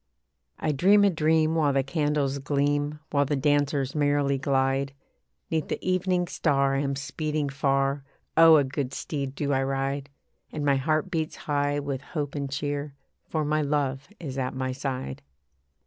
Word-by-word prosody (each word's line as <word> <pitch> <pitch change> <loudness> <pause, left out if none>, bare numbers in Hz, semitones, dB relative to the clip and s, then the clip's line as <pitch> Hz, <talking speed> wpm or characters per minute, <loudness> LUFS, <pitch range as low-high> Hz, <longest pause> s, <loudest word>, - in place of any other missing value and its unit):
I 155 - 0
dream 195 +8 +5
a 200 - +5
dream 160 -1 +2
while 150 -4 +2
the 135 0 +2
candles 145 -1 0
gleam, 145 +1 0
While 140 -1 +3
the 145 +2 0
dancers 145 -1 +1
merrily 145 -2 +1
glide. 135 0 +1 0.6
Neath 160 -1 0
the - - -2
evening 185 -1 +1
star 140 -4 +1
I 135 - +1
am 140 -1 -1
speeding 150 +1 -2
far, 135 0 0 0.3
Oh! 165 0 +8
a 145 - +5
good 135 0 -3
steed 140 -3 -4
do 145 0 -1
I 135 - +2
ride; 135 +1 -2 0.4
And 150 -2 -3
my 140 -1 +4
heart 155 +6 0
beats 160 -3 -2
high 145 0 -1
with 140 -2 -3
hope 145 -1 -4
and 140 -2 -3
cheer, 145 +1 -3 0.3
For 155 -2 -1
my 155 +1 +1
love 140 -2 -1
is 135 -5 -5
at 130 0 -2
my 130 0 -2
side. 130 - -4
145 Hz, 165 wpm, -26 LUFS, 135-150 Hz, 0.6 s, Oh